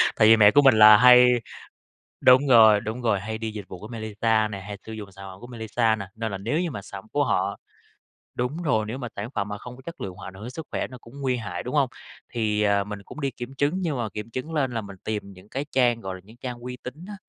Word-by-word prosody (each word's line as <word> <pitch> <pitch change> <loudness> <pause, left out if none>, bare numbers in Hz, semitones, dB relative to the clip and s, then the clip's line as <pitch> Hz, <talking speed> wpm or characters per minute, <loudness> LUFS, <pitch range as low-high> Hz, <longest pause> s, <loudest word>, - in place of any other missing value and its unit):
Tại 110 - +5
vì 115 +1 +8
mẹ 105 -1 +7
của 145 - +6
mình 135 -4 +6
là 110 0 +10
hay 125 +2 +8 0.9
đúng 130 +3 +6
rồi, 110 -5 +7
đúng 110 +4 -5
rồi, 110 -5 +1
hay 110 +3 -5
đi 110 0 -4
dịch 105 -2 -7
vụ 90 - -9
của 105 - -9
Mailisa 110 -1 0
nè, 100 - -5
hay 100 +1 -7
sử 110 - -8
dụng 105 -3 -8
sản 95 +1 -11
phẩm 95 - -13
của 120 - -10
Mailisa 115 -1 0
nè, 100 -3 -6
nên 110 -1 -3
là 100 - -3
nếu 115 +11 -1
như 175 -3 -2
mà 100 - -6
sản 100 0 -9
của 145 - +2
họ 95 +2 0 0.8
đúng 130 +8 -3
rồi, 110 -10 +1
nếu 115 +5 -5
mà 125 -3 -5
sản 105 +3 -4
phẩm 100 - -2
mà 105 0 -5
không 125 +3 -10
có 130 - -15
chất 170 - -8
lượng 95 -2 -5
hoặc 95 - -10
ảnh 95 - -11
hưởng 95 - -12
đến 120 - -6
sức 155 +5 -8
khỏe - - -2
nó 125 - -11
cũng 125 +5 -13
nguy 130 -2 0
hại, 100 -7 -5
đúng 125 - -6
hông? 140 -3 +3 0.4
Thì, 105 -3 0
à, 100 -1 +2
mình 105 0 -7
cũng 150 - -10
đi 140 -1 -1
kiểm 125 +1 -8
chứng 145 +4 0
nhưng 160 -6 -1
mà 120 -3 -2
kiểm 105 +2 -6
chứng 130 +7 -5
lên 140 -5 0
là 115 - -2
mình 100 -2 -10
tìm 105 -2 -4
những 95 +2 -16
cái 135 +5 -4
trang, 120 -3 +2
gọi 95 -3 -5
là, 95 - -10
những 110 +4 -17
trang 125 -1 -6
uy 125 +1 -7
tín 125 - -7
á, 210 - -7
110 Hz, 285 wpm, -25 LUFS, 105-125 Hz, 0.9 s, là